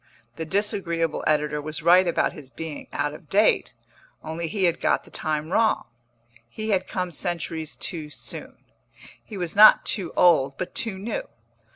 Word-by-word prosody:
The 160 - -5
disagreeable 175 -4 -1
editor 150 -1 +1
was 155 +1 -5
right 180 +2 +6
about 170 - +1
his 145 -4 -12
being 160 +1 -7
out 145 0 -2
of 155 0 -13
date, 205 - +2 0.5
only 160 +1 -4
he 195 +3 -2
had 170 -2 +2
got - - +2
the - - -18
time 155 0 -3
wrong. 220 +2 +2 0.7
He 215 - -5
had 185 -2 +1
come 180 -2 -3
centuries 165 -1 -3
too 160 -5 -5
soon; - - -6 0.7
he 210 - -9
was 175 -1 -3
not 215 +1 +8
too 190 -6 0
old, 140 -6 +4
but 185 - -5
too 220 -4 -2
new. 210 +4 -4
170 Hz, 165 wpm, -24 LUFS, 155-190 Hz, 0.7 s, not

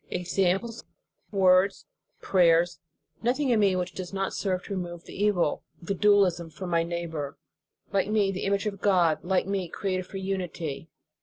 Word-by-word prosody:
Examples, 190 +5 -1 0.5
words, 190 -1 +3 0.4
prayers, 175 -2 +3 0.4
nothing 260 +4 +1
in 235 -3 +3
me 200 -3 +3
which 180 0 -2
does 185 -2 -6
not 195 -1 -2
serve 185 -2 -1
to - - -6
remove 175 -2 -5
the - - -12
evil, 195 -6 +1 0.2
the 175 +3 -3
dualism 195 -4 +3
from 180 +2 -7
my 170 0 +3
neigh 170 +1 -3
bor, 150 -4 -5 0.6
like 195 0 +1
me, 210 -2 +2
the 190 - -4
image 200 +1 0
of 200 -2 -4
God, 175 -6 +3
like 185 +1 +1
me, 190 -2 -2
created 185 0 -3
for 195 - -7
unity. 175 -6 -4
185 Hz, 165 wpm, -27 LUFS, 175-200 Hz, 0.6 s, words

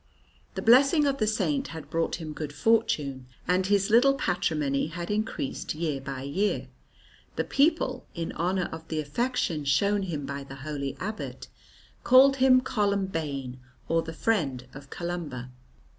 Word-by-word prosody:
The - - -3
blessing 275 +6 +6
of 275 -1 0
the 215 - +2
Saint 270 +6 0
had 160 -3 -9
brought 165 0 0
him 160 -3 -6
good 150 -1 -5
fortune, 145 - +1 0.2
and 185 +2 +2
his 200 +1 +2
little 265 +4 +6
patrimony 155 - 0
had 170 +3 -5
increased 215 - -2
year 155 -4 -2
by 135 -1 -6
year. 190 +10 -1 0.7
The - - 0
people, 310 +4 +1
in 165 -2 -3
honour 180 +2 -1
of 160 0 -8
the 155 - -2
affection 165 - -1
shown 200 +9 +2
him 160 -7 -3
by 140 0 -5
the 135 0 -10
holy 140 -2 -4
abbot, 215 +3 -6 0.5
called 270 +2 +6
him 255 -1 +6
"Columbain" 165 - -2 0.3
or 165 0 +2
"the 165 - -6
friend 155 - -1
of 135 0 -11
Columba." 155 -9 -5
170 Hz, 150 wpm, -27 LUFS, 145-220 Hz, 0.7 s, blessing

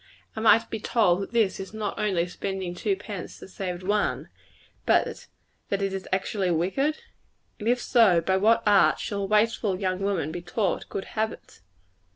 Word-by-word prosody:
Am 220 0 -1
I - - +9
to - - -8
be 220 - -5
told 200 -5 +2
that 195 - -6
this 225 -5 +1
is 195 +2 -7
not 210 -2 -3
only 185 -5 +1
spending 190 0 -4
two 195 +2 -1
pence 200 -1 -8
to - - -11
save 185 -1 -5
one, 205 +2 0 0.6
but - - +1 0.4
that 200 0 -1
it 195 -1 -1
is 190 -1 -5
actually 190 0 0
wicked? 195 - 0 0.6
If 235 +3 +1
so, 225 -9 +4
by 190 +3 +1
what 225 +4 +3
art 205 -2 +5
shall 200 -1 -3
a - - -1
wasteful 210 -2 +1
young 185 -2 -1
woman 195 -6 -1
be 175 - -5
taught 180 +3 -2
good 195 - -4
habits? 220 - -5
195 Hz, 180 wpm, -26 LUFS, 185-220 Hz, 0.6 s, I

